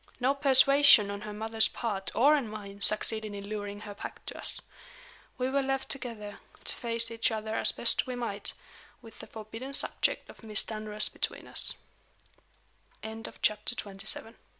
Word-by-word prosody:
No 260 Hz, +2 st, +2 dB
persuasion 275 Hz, -5 st, +6 dB
on 200 Hz, 0 st, -6 dB
her 210 Hz, 0 st, -7 dB
mother's 220 Hz, +1 st, +1 dB
part 205 Hz, -5 st, -4 dB
or 285 Hz, +6 st, +5 dB
on 275 Hz, -6 st, -2 dB
mine 200 Hz, -2 st, -9 dB
succeeded 215 Hz, 0 st, +3 dB
in 200 Hz, 0 st, -8 dB
luring 205 Hz, -1 st, -6 dB
her 210 Hz, -1 st, -8 dB
back 200 Hz, -, -9 dB
to -, -, -6 dB
us. -, -, +3 dB, 0.8 s
We 255 Hz, 0 st, -1 dB
were 275 Hz, +1 st, +1 dB
left 270 Hz, 0 st, -2 dB
together, 230 Hz, -6 st, -5 dB, 0.2 s
to -, -, 0 dB
face 230 Hz, -1 st, -1 dB
each 230 Hz, 0 st, 0 dB
other 220 Hz, 0 st, -4 dB
as -, -, +3 dB
best 235 Hz, -, +2 dB
we 255 Hz, -, -4 dB
might 230 Hz, -4 st, 0 dB, 0.5 s
with 225 Hz, -, -14 dB
the -, -, -10 dB
forbidden 225 Hz, +5 st, -4 dB
subject -, -, +1 dB
of -, -, -15 dB
Miss 215 Hz, -2 st, +2 dB
Dunross 215 Hz, -1 st, -2 dB
between -, -, -5 dB
us. -, -, -3 dB, 1.3 s
CHAPTER 220 Hz, +1 st, -3 dB
XXVIII. 205 Hz, -5 st, -7 dB
LOVE 195 Hz, +2 st, 0 dB
AND -, -, -9 dB
MONEY. 225 Hz, +2 st, -16 dB
220 Hz, 175 wpm, -29 LUFS, 210-245 Hz, 1.3 s, persuasion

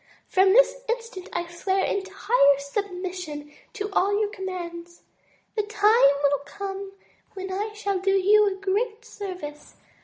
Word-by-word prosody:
From 380 Hz, 0 st, +4 dB
this -, -, +5 dB
instant 460 Hz, -6 st, -4 dB
I 345 Hz, -, -2 dB
swear 380 Hz, +3 st, -1 dB
entire 385 Hz, -, +2 dB
submission 360 Hz, -1 st, -5 dB, 0.2 s
to 415 Hz, -2 st, -4 dB
all 405 Hz, +2 st, +2 dB
your 420 Hz, -1 st, 0 dB
commands. 345 Hz, -3 st, -7 dB, 0.5 s
The 430 Hz, -, +2 dB
time 420 Hz, -4 st, +5 dB
will 285 Hz, 0 st, +3 dB
come 390 Hz, +3 st, -6 dB, 0.4 s
when 380 Hz, 0 st, -5 dB
I 415 Hz, +3 st, -2 dB
shall 400 Hz, -2 st, -1 dB
do 385 Hz, +1 st, 0 dB
you 415 Hz, +2 st, +5 dB
a 385 Hz, -1 st, -2 dB
great 425 Hz, +3 st, -1 dB
service. 360 Hz, -7 st, -8 dB
390 Hz, 135 wpm, -25 LUFS, 360-415 Hz, 0.5 s, this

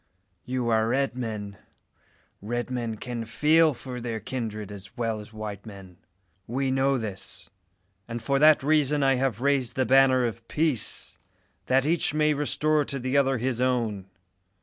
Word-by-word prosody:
You 125 Hz, -1 st, -1 dB
are 110 Hz, -1 st, +3 dB
red 135 Hz, +1 st, 0 dB
men. 105 Hz, -5 st, -5 dB, 0.8 s
Red 120 Hz, +4 st, -3 dB
men 120 Hz, -3 st, -3 dB
can 120 Hz, +1 st, -5 dB
feel 155 Hz, +6 st, +3 dB
for 125 Hz, 0 st, -7 dB
their 115 Hz, -2 st, -3 dB
kindred 110 Hz, -3 st, -5 dB
as 100 Hz, -1 st, -10 dB
well 115 Hz, -2 st, -1 dB
as 105 Hz, +1 st, -11 dB
white 110 Hz, -2 st, -6 dB
men. 95 Hz, -5 st, -12 dB, 0.5 s
We 130 Hz, +3 st, -1 dB
know 135 Hz, +1 st, +2 dB
this; 105 Hz, -5 st, -4 dB, 0.6 s
and 115 Hz, 0 st, -4 dB
for 140 Hz, +3 st, 0 dB
that 155 Hz, -1 st, +6 dB
reason 150 Hz, -1 st, +2 dB
have 135 Hz, -4 st, +2 dB
I -, -, -6 dB
raised 135 Hz, -4 st, +1 dB
the 130 Hz, -, +1 dB
banner 130 Hz, -1 st, +5 dB
of 115 Hz, 0 st, -5 dB
peace, 150 Hz, -8 st, -2 dB, 0.5 s
that 135 Hz, +1 st, +3 dB
each 160 Hz, -1 st, +1 dB
may 150 Hz, 0 st, +3 dB
restore 150 Hz, +1 st, +1 dB
to 140 Hz, -, -4 dB
the 130 Hz, +1 st, -2 dB
other 135 Hz, -1 st, +3 dB
his 125 Hz, 0 st, -1 dB
own. 115 Hz, -7 st, 0 dB
125 Hz, 160 wpm, -26 LUFS, 110-135 Hz, 0.8 s, that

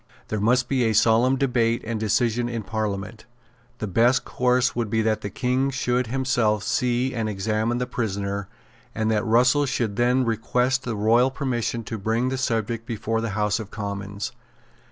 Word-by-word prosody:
There 110 Hz, -, -1 dB
must 125 Hz, +4 st, +2 dB
be 130 Hz, -2 st, +1 dB
a 110 Hz, -, +2 dB
solemn 115 Hz, +4 st, +4 dB
debate 120 Hz, -3 st, +1 dB
and 110 Hz, 0 st, -3 dB
decision 120 Hz, +3 st, +1 dB
in 115 Hz, -2 st, -4 dB
Parliament. 105 Hz, +1 st, -4 dB, 0.5 s
The -, -, -4 dB
best 115 Hz, +6 st, +2 dB
course 125 Hz, 0 st, +1 dB
would 115 Hz, -3 st, -1 dB
be 110 Hz, +1 st, +1 dB
that 110 Hz, 0 st, 0 dB
the 100 Hz, -, -4 dB
King 130 Hz, +5 st, 0 dB
should 125 Hz, -2 st, 0 dB
himself 120 Hz, -4 st, +1 dB
see 125 Hz, +4 st, 0 dB
and 115 Hz, -3 st, -2 dB
examine 110 Hz, +3 st, -1 dB
the 125 Hz, -, -1 dB
prisoner, 100 Hz, -5 st, -3 dB, 0.5 s
and 110 Hz, 0 st, 0 dB
that 110 Hz, 0 st, +1 dB
Russell 125 Hz, +5 st, +3 dB
should 110 Hz, -5 st, -2 dB
then 125 Hz, +2 st, +3 dB
request 125 Hz, +3 st, 0 dB
the 115 Hz, -3 st, -2 dB
royal 115 Hz, +5 st, +3 dB
permission 125 Hz, -4 st, -2 dB
to 110 Hz, 0 st, -5 dB
bring 115 Hz, +5 st, 0 dB
the 130 Hz, 0 st, -2 dB
subject 115 Hz, -2 st, -1 dB
before 115 Hz, 0 st, -2 dB
the 115 Hz, -, -2 dB
House 105 Hz, +1 st, +1 dB
of 110 Hz, -2 st, -7 dB
Commons. 100 Hz, -1 st, -5 dB
115 Hz, 175 wpm, -24 LUFS, 110-125 Hz, 0.5 s, solemn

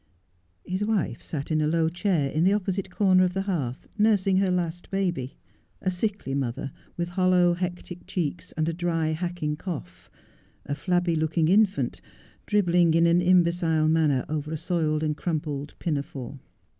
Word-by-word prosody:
His 185 Hz, +3 st, -2 dB
wife 210 Hz, -4 st, -1 dB
sat 145 Hz, -1 st, -5 dB
in 155 Hz, 0 st, +2 dB
a 150 Hz, -, +2 dB
low 160 Hz, +1 st, +2 dB
chair 170 Hz, -4 st, 0 dB
in 155 Hz, -, +1 dB
the 190 Hz, +3 st, +4 dB
opposite 195 Hz, -2 st, -1 dB
corner 185 Hz, -1 st, +4 dB
of 180 Hz, 0 st, 0 dB
the 195 Hz, -, 0 dB
hearth 145 Hz, -11 st, -3 dB
nursing 200 Hz, -3 st, +3 dB
her 195 Hz, 0 st, +2 dB
last 175 Hz, -1 st, -2 dB
baby. 175 Hz, -10 st, -2 dB, 0.4 s
A 185 Hz, -, -1 dB
sickly 195 Hz, -6 st, -2 dB
mother 135 Hz, 0 st, -2 dB, 0.3 s
with 170 Hz, 0 st, -2 dB
hollow, 180 Hz, -1 st, +3 dB
hectic 175 Hz, 0 st, -5 dB
cheeks 175 Hz, 0 st, -3 dB
and 155 Hz, 0 st, -1 dB
a 165 Hz, -, 0 dB
dry, 165 Hz, -2 st, 0 dB
hacking 160 Hz, -2 st, -2 dB
cough; 90 Hz, -, -7 dB, 0.6 s
a 145 Hz, -, -3 dB
flabby 175 Hz, +1 st, 0 dB
looking 160 Hz, 0 st, +1 dB
infant, 205 Hz, +1 st, +2 dB, 0.5 s
dribbling 175 Hz, -5 st, +3 dB
in 165 Hz, 0 st, +5 dB
an 170 Hz, +1 st, +4 dB
imbecile 170 Hz, -3 st, +3 dB
manner 155 Hz, -5 st, +2 dB
over 150 Hz, 0 st, -3 dB
a 160 Hz, -, -2 dB
soiled 155 Hz, -2 st, 0 dB
and 155 Hz, -1 st, 0 dB
crumpled 150 Hz, -4 st, -3 dB
pinafore. 140 Hz, -4 st, -4 dB
170 Hz, 160 wpm, -26 LUFS, 155-185 Hz, 0.6 s, in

